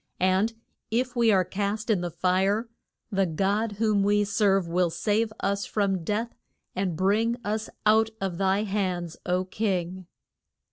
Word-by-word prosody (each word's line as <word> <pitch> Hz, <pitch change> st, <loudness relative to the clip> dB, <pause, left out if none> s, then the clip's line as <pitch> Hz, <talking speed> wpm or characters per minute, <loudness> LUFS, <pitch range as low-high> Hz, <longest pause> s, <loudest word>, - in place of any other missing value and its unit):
And 190 Hz, +5 st, +2 dB, 0.3 s
if 250 Hz, +3 st, -1 dB
we 235 Hz, -2 st, +4 dB
are 190 Hz, -3 st, +3 dB
cast 205 Hz, +4 st, -2 dB
in 195 Hz, -5 st, +2 dB
the 175 Hz, -, -2 dB
fire, 190 Hz, +6 st, +1 dB, 0.4 s
the 195 Hz, -2 st, +2 dB
God 200 Hz, +6 st, 0 dB
whom 210 Hz, -1 st, +1 dB
we 205 Hz, +1 st, +3 dB
serve 200 Hz, -2 st, +2 dB
will 175 Hz, +1 st, +1 dB
save 215 Hz, +5 st, 0 dB
us 200 Hz, +1 st, -1 dB
from 195 Hz, -4 st, 0 dB
death 220 Hz, +6 st, -2 dB, 0.4 s
and 185 Hz, -4 st, -1 dB
bring 220 Hz, +6 st, +2 dB
us 215 Hz, +1 st, -2 dB, 0.2 s
out 220 Hz, +1 st, +5 dB
of 190 Hz, -2 st, -3 dB
thy 195 Hz, +1 st, +2 dB
hands, 185 Hz, -5 st, -2 dB
O 180 Hz, +1 st, +1 dB
king. 185 Hz, -3 st, -2 dB
200 Hz, 150 wpm, -26 LUFS, 185-215 Hz, 0.4 s, out